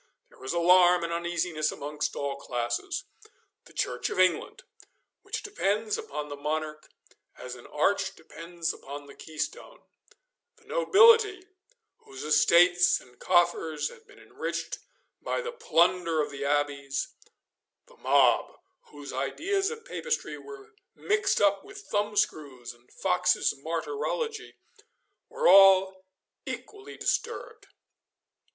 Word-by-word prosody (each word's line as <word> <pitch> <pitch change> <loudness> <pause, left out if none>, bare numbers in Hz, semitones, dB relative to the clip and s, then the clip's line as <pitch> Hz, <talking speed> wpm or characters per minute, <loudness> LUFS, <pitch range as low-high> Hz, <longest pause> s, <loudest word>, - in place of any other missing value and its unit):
There - - -21
was 130 +1 -5
alarm 175 +1 +5
and 170 0 -2
uneasiness 170 -2 -1
amongst 150 +1 -4
all 140 -1 -3
classes. 125 - -3 0.6
The - - -18
Church - - -2
of - - -4
England, 185 - +1 0.6
which - - -5
depends 215 - -1
upon 150 +1 -5
the 145 - -6
monarch 155 +1 -4 0.5
as 125 - -8
an 120 -1 -11
arch 190 +6 0
depends 165 +1 -5
upon 145 +1 -9
the 140 - -13
keystone; 160 - -6 0.8
the - - -26
nobility, 445 -4 +5 0.5
whose 135 -1 -11
estates 170 +4 +4
and 125 -1 -20
coffers 175 -3 +1
had 460 -2 -17
been - - -18
enriched - - -5 0.4
by - - -2
the 480 -1 -4
plunder 175 - +1
of 150 -1 -1
the 140 0 -6
abbeys; 140 -1 -1 0.8
the - - -21
mob, - - +3 0.3
whose 145 -1 -10
ideas 385 - -1
of 460 0 -8
Papistry 485 -1 -3
were 420 +1 -12 0.2
mixed 420 -1 +1
up 200 -1 +3
with 400 0 -12
thumbscrews 155 - -1
and 120 +1 -26
Fox's 180 -1 +1
Martyrology, 435 - -4 0.7
were 485 +1 0
all 190 -1 +6 0.4
equally 410 -1 -8
disturbed. - - -3
175 Hz, 120 wpm, -28 LUFS, -, 0.8 s, all